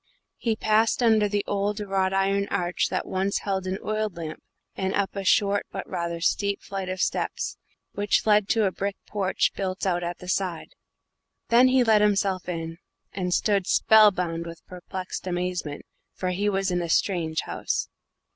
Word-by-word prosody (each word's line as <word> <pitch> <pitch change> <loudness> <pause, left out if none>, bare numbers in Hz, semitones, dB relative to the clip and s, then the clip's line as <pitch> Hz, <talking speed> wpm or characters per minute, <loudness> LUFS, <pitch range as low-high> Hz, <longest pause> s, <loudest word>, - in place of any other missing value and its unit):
He 230 -2 0
passed 220 +3 +2
under 220 -3 +4
the 205 0 -1
old 205 +1 -1
wrought 195 -2 0
iron 195 +1 +1
arch 175 -1 0
that - - -2
once 190 +1 -1
held 190 -2 -2
an 185 +1 -1
oil 215 0 0
lamp, 165 -4 -7 0.3
and 190 0 -1
up 200 0 -1
a 195 - -3
short 200 +1 +2
but 195 - -5
rather 170 -1 -3
steep 200 +3 0
flight 195 -2 -5
of 185 0 -4
steps, - - -1 0.3
which 205 0 +1
led 210 -2 +4
to 225 -3 +3
a 190 - +1
brick 200 +1 -3
porch 195 -2 0
built 190 0 -3
out 175 -2 +1
at 175 0 -3
the 180 - -11
side. 180 -3 -2 0.8
Then 240 +2 +6
he 255 0 +4
let 220 -3 +4
himself 195 -3 +1
in, 165 -1 -4 0.3
and 180 -2 -2
stood 200 0 +1
spellbound 180 -6 +4
with 170 0 -10
perplexed 185 +1 -7
amazement, 175 -4 -3 0.3
for 185 - -2
he 200 +3 0
was 195 -1 0
in 175 0 0
a 170 - -4
strange 160 -3 +1
house. - - -2
195 Hz, 175 wpm, -25 LUFS, 180-205 Hz, 0.8 s, Then